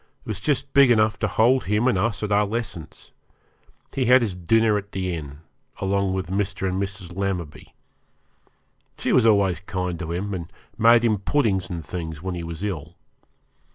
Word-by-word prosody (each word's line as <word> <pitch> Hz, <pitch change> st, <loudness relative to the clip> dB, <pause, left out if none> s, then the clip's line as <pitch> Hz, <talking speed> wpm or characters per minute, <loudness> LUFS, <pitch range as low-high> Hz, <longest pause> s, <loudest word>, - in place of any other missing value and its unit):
It -, -, -22 dB
was 110 Hz, -3 st, -3 dB
just 140 Hz, +4 st, -1 dB
big 140 Hz, -2 st, +6 dB
enough 110 Hz, -3 st, +3 dB
to 105 Hz, -, +1 dB
hold 120 Hz, +6 st, +3 dB
him 105 Hz, +5 st, +1 dB
and 130 Hz, -, +3 dB
us 105 Hz, +2 st, -1 dB
at 105 Hz, -, -2 dB
our 105 Hz, 0 st, +3 dB
lessons. 100 Hz, -8 st, -6 dB, 0.8 s
He 130 Hz, -, 0 dB
had 125 Hz, +1 st, +6 dB
his 100 Hz, -5 st, -2 dB
dinner 110 Hz, +5 st, +2 dB
at 105 Hz, 0 st, -4 dB
the 95 Hz, -1 st, -2 dB
inn, 75 Hz, -2 st, -7 dB, 0.4 s
along 100 Hz, 0 st, 0 dB
with 95 Hz, -1 st, -3 dB
Mr. 95 Hz, -1 st, -1 dB
and 95 Hz, +1 st, -1 dB
Mrs. 95 Hz, -3 st, -5 dB
Lammerby. 90 Hz, -6 st, -4 dB, 1.2 s
She -, -, 0 dB
was 120 Hz, -3 st, +5 dB
always 100 Hz, -6 st, +3 dB
kind 90 Hz, -3 st, -3 dB
to 85 Hz, -2 st, -5 dB
him, 100 Hz, +4 st, -3 dB
and 85 Hz, -3 st, -6 dB, 0.2 s
made 115 Hz, +1 st, +5 dB
him 110 Hz, -3 st, +2 dB
puddings 100 Hz, -7 st, 0 dB
and 85 Hz, -4 st, -5 dB
things 80 Hz, -2 st, -5 dB
when 95 Hz, +3 st, -4 dB
he 85 Hz, -1 st, -5 dB
was 85 Hz, +2 st, -6 dB
ill. 90 Hz, -9 st, -4 dB
100 Hz, 185 wpm, -23 LUFS, 90-110 Hz, 1.2 s, big